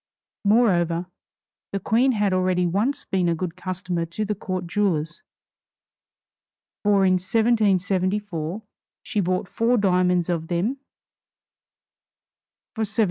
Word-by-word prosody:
Moreover, 180 Hz, -6 st, +3 dB, 0.7 s
the 195 Hz, -, -2 dB
Queen 240 Hz, +7 st, +2 dB
had 205 Hz, -3 st, +1 dB
already 185 Hz, -1 st, +1 dB
once 220 Hz, +11 st, 0 dB
been 180 Hz, -2 st, 0 dB
a 170 Hz, -, +1 dB
good 170 Hz, 0 st, -4 dB
customer 185 Hz, -1 st, -3 dB
to 215 Hz, +6 st, -3 dB
the 210 Hz, -, -1 dB
court 185 Hz, -2 st, -4 dB
jewelers, 170 Hz, -4 st, -1 dB, 1.6 s
for 200 Hz, -2 st, +3 dB
in 185 Hz, -, +4 dB
1774 195 Hz, -3 st, 0 dB, 0.4 s
she 210 Hz, -, -2 dB
bought 185 Hz, 0 st, 0 dB
four 235 Hz, +5 st, +1 dB
diamonds 180 Hz, -3 st, +2 dB
of 165 Hz, -2 st, -2 dB
them 185 Hz, +11 st, -1 dB, 2.0 s
for 220 Hz, -, -2 dB
$75,000. 215 Hz, +2 st, -4 dB
185 Hz, 115 wpm, -24 LUFS, 175-210 Hz, 2.0 s, in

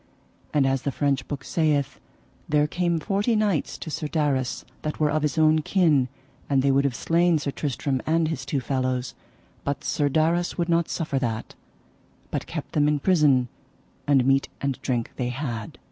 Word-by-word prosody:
And 145 Hz, -2 st, +3 dB
as 135 Hz, -1 st, +1 dB
the 140 Hz, -, -1 dB
French 140 Hz, 0 st, 0 dB
book 145 Hz, -2 st, -5 dB
saith, 150 Hz, -4 st, 0 dB, 0.5 s
there 150 Hz, 0 st, +3 dB
came 170 Hz, +1 st, 0 dB
forty 200 Hz, +8 st, 0 dB
knights 205 Hz, -8 st, 0 dB
to 160 Hz, -, -7 dB
Sir 150 Hz, -, -3 dB
Darras 145 Hz, -5 st, -1 dB, 0.2 s
that 155 Hz, -, -4 dB
were 150 Hz, -1 st, +2 dB
of 155 Hz, +1 st, +1 dB
his 150 Hz, -1 st, -1 dB
own 155 Hz, 0 st, +5 dB
kin, 155 Hz, -7 st, +3 dB, 0.4 s
and 135 Hz, -2 st, +3 dB
they 140 Hz, -, +4 dB
would 140 Hz, +1 st, +3 dB
have 135 Hz, -3 st, 0 dB
slain 170 Hz, +3 st, +2 dB
Sir 145 Hz, -1 st, -2 dB
Tristram 135 Hz, -2 st, -2 dB
and 165 Hz, 0 st, +2 dB
his 155 Hz, -5 st, -3 dB
two 135 Hz, 0 st, -2 dB
fellows, 130 Hz, -1 st, -1 dB, 0.5 s
but 140 Hz, +1 st, -2 dB
Sir 145 Hz, -1 st, +1 dB
Darras 165 Hz, +4 st, +1 dB
would 170 Hz, -1 st, -1 dB
not 170 Hz, 0 st, +2 dB
suffer 150 Hz, -5 st, -1 dB
that, 115 Hz, -4 st, -3 dB, 0.8 s
but -, -, -3 dB
kept -, -, -5 dB
them 150 Hz, -1 st, +2 dB
in 150 Hz, 0 st, +2 dB
prison, 145 Hz, -6 st, +3 dB, 0.6 s
and 135 Hz, -3 st, +4 dB
meat 135 Hz, +1 st, +3 dB
and 140 Hz, -2 st, -2 dB
drink 120 Hz, -3 st, -1 dB
they 125 Hz, -1 st, -1 dB
had. 120 Hz, -4 st, -5 dB
145 Hz, 180 wpm, -25 LUFS, 135-160 Hz, 0.8 s, own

